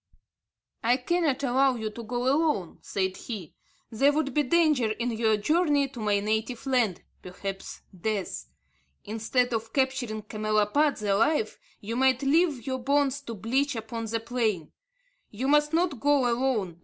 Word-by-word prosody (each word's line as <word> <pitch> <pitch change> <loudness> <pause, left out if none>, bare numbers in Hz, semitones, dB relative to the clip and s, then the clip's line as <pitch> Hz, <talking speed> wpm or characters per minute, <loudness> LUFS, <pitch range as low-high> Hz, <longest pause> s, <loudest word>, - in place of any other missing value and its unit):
"I 240 +2 +3
cannot 285 0 0
allow 265 0 +3
you 220 -2 -4
to 235 - -8
go 240 +2 -3
alone," 270 - +1
said 190 -1 -2
he; 200 -10 -7 0.4
"there 275 +6 +4
would 290 -2 -1
be 300 - +3
danger 300 -5 +3
in 240 +2 -2
your 220 -1 +2
journey 290 - +2
to 255 -2 -10
my 210 -2 +1
native 220 +4 -2
land, 245 -9 +1 0.2
perhaps 195 +1 -7
death. 185 - -3 0.6
Instead 230 +3 0
of 225 0 -3
capturing 260 -5 -1
camelopards 215 +6 +1
alive, 220 +4 +1 0.2
you 225 +3 -4
might 260 +1 +3
leave 285 -3 +2
your 260 -1 -2
bones 280 +1 +1
to 235 -5 -7
bleach 260 +7 0
upon 225 +1 -5
the 225 +1 -2
plain. 225 -8 -2 0.6
You 245 +6 -3
must 295 +1 +3
not 330 -5 +1
go 285 0 +3
alone. 235 -8 0
245 Hz, 150 wpm, -27 LUFS, 215-275 Hz, 0.6 s, there